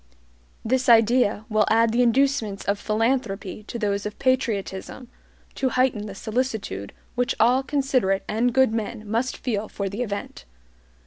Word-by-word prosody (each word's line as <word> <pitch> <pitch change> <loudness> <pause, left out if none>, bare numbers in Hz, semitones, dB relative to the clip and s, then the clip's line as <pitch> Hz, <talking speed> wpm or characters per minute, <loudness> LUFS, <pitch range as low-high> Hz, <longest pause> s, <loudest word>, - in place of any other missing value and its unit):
This 255 +2 +1
idea 225 -2 +4
will 215 -1 +2
add 225 +1 +4
the 240 +2 +2
inducements 245 -4 +1
of 200 0 0
philanthropy 215 -3 -1
to - - -5
those 200 -3 -1
of 210 0 -6
patriotism, 240 -2 -2 0.4
to 265 - 0
heighten 250 -5 +1
the 195 - -8
solicitude 220 - -3 0.2
which 245 0 0
all 245 +4 +4
considerate 265 -8 0
and 235 +3 +1
good 260 -2 +3
men 220 -1 -4
must 230 +4 -1
feel 215 -4 -2
for 200 -1 -3
the 205 +5 -5
event. 200 - -5
225 Hz, 145 wpm, -24 LUFS, 205-255 Hz, 0.4 s, idea